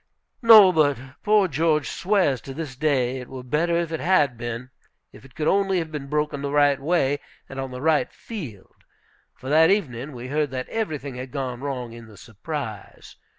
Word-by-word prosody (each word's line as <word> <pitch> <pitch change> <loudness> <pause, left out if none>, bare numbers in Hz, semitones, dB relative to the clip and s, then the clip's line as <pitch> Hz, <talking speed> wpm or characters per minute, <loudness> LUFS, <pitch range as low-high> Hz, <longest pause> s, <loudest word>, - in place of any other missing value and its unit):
No, 220 -5 +9
but 150 -4 +2 0.2
poor 210 -2 +3
George 155 -1 +1
swears 185 -10 +1
to 135 - -9
this 150 -4 -6
day 130 -3 0
it 125 - -10
were 130 -1 -8
better 165 +7 0
it 170 -1 -1
had 150 -8 +2
been, 120 +2 -6 0.4
if - - -15
it 135 - -17
could 155 -2 -2
only 195 -1 +2
have 165 -2 -3
been 145 -3 -6
broken 150 -1 -1
the 140 - -3
right 145 -1 +3
way 145 -2 +1 0.3
and 135 - -8
on 135 0 -4
the 125 0 -7
right 160 -1 +2
field. 140 - -9 0.6
For 130 - -11
that 160 +2 +5
evening 145 - -1
we 125 +1 -8
heard 150 +1 0
that 130 -1 -5
everything 150 - -4
had 130 +1 -6
gone 130 -2 -4
wrong 125 -4 -4
in 115 -1 -11
the 105 -2 -15
surprise. 115 - -8
145 Hz, 190 wpm, -24 LUFS, 130-160 Hz, 0.6 s, No